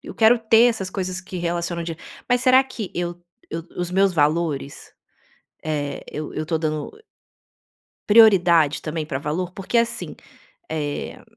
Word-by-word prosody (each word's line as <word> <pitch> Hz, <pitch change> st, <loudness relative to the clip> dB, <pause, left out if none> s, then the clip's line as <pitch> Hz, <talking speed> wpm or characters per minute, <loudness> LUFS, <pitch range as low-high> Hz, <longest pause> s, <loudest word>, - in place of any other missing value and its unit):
quero 225 Hz, +2 st, +5 dB
ter 225 Hz, 0 st, +5 dB
essas 220 Hz, -6 st, 0 dB
coisas 185 Hz, -1 st, -4 dB
que 185 Hz, -1 st, -8 dB
relacionam 170 Hz, 0 st, -2 dB
dinheiro, 165 Hz, 0 st, -7 dB, 0.3 s
mas 245 Hz, 0 st, +3 dB
será 260 Hz, +1 st, +6 dB
que 235 Hz, -7 st, -7 dB
o 175 Hz, 0 st, -7 dB, 0.3 s
o 165 Hz, +2 st, -7 dB
os 175 Hz, -, -3 dB
meus 195 Hz, 0 st, +3 dB
valores, 150 Hz, -2 st, -1 dB, 0.7 s
eh, 150 Hz, -2 st, -3 dB
eu 150 Hz, 0 st, -5 dB
eu 155 Hz, -, -3 dB
tô 160 Hz, +1 st, 0 dB
dando 155 Hz, -1 st, -3 dB, 1.2 s
prioridade 180 Hz, -8 st, +5 dB
também 155 Hz, 0 st, -3 dB
pra 145 Hz, -3 st, -4 dB
valor? 155 Hz, +5 st, -3 dB
Porque 195 Hz, +5 st, -3 dB
assim, 235 Hz, 0 st, 0 dB, 0.6 s
eh, 145 Hz, -2 st, -4 dB
175 Hz, 145 wpm, -22 LUFS, 155-205 Hz, 1.2 s, será